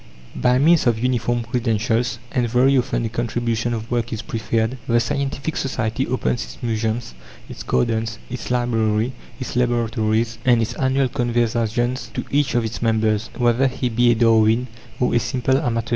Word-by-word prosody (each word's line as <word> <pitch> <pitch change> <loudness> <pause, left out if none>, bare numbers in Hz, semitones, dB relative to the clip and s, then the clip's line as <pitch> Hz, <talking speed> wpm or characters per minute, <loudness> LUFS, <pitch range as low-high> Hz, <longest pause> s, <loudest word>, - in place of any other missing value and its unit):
By 125 0 +2
means 155 +1 +4
of 115 -2 +3
uniform 120 0 0
credentials 115 0 0
and 120 -4 0
very 130 +4 +4
often 120 -2 0
a - - -2
contribution 115 0 -1
of 115 0 -4
work 120 -1 -1
is 110 - -4
preferred 115 +2 -1
the 120 0 +3
scientific 140 +4 -2
society 130 -1 -1
opens 65 - -1
its - - -11
museums, 110 - -2 0.3
its - - -9
gardens, 110 - 0
its 125 - -6
library, 115 -1 +1 0.3
its 130 - -5
laboratories, 115 -2 0
and 125 -2 +4
its 115 0 -1
annual 130 0 +1
conversaziones 120 0 0
to - - -3
each 145 -2 +1
of 120 -1 +2
its 110 -4 -5
members, 110 -1 +1
whether 120 +2 +3
he 125 -1 -2
be 120 +1 +3
a 120 - +4
Darwin, 115 +1 +4 0.3
or 125 - +1
a 120 - +4
simple 130 +2 0
amateur. 115 -6 -2
120 Hz, 165 wpm, -21 LUFS, 110-125 Hz, 0.3 s, means